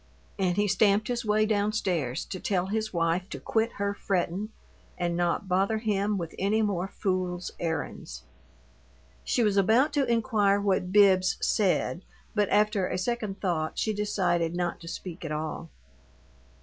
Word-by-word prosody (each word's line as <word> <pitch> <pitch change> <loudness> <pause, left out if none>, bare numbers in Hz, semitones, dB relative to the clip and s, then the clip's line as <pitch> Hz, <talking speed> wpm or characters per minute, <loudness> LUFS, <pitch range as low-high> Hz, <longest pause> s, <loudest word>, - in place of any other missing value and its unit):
And 185 -1 +1
he 205 0 +2
stamped 210 +2 +3
his 240 0 -1
way 215 0 +2
down 210 -1 +1
stairs 165 - -1
to 185 - -6
tell 185 -2 0
his 215 +2 -2
wife 170 +2 0
to - - -6
quit 225 +1 0
her 200 0 -1
frettin' 195 +1 -2 0.5
and 175 -1 -1
not 175 +2 0
bother 195 +4 +1
him 210 -2 0
with 170 -3 -5
any 215 +3 +2
more 190 -3 -1
fool's 185 -3 -2
errands. 160 - -4 1.0
She 240 - +1
was 205 -2 +2
about 230 +10 +4
to 285 -2 +2
inquire 215 -4 +2
what 190 -2 0
Bibbs 190 -2 +5
"said," 185 -3 +1 0.3
but 205 -2 +1
after 210 -2 +2
a - - -2
second 210 0 -3
thought 160 -5 -1
she 215 - 0
decided 180 -5 0
not 175 -1 -2
to 165 - -11
speak 175 0 -7
at 160 - -4
all. 155 +2 -4
195 Hz, 160 wpm, -28 LUFS, 175-210 Hz, 1.0 s, Bibbs